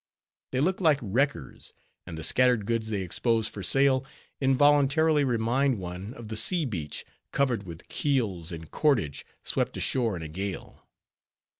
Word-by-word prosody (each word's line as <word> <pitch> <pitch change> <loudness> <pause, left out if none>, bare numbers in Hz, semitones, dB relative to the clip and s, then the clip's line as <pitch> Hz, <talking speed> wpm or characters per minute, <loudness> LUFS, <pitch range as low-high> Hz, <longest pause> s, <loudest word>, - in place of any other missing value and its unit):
They 130 - 0
look 185 +5 +1
like 155 -5 +4
wreckers; 135 +6 -2 0.3
and 85 -3 -7
the 80 - -6
scattered 125 +3 +3
goods 115 0 -1
they 100 -3 -2
expose 110 +5 0
for 105 - -7
sale, 135 +4 +3 0.4
involuntarily 145 +3 +4
remind 125 +1 +1
one 95 +5 -7
of 115 -2 -9
the 110 - -4
sea 165 - +3
beach, 85 - -4 0.3
covered 120 -8 0
with 85 -1 -10
keels 105 - -1
and 80 -2 -8
cordage, 115 - 0 0.2
swept - - -2
ashore 115 -6 0
in 85 - -6
a - - -5
gale. 95 +5 -6
115 Hz, 150 wpm, -27 LUFS, 95-140 Hz, 0.4 s, like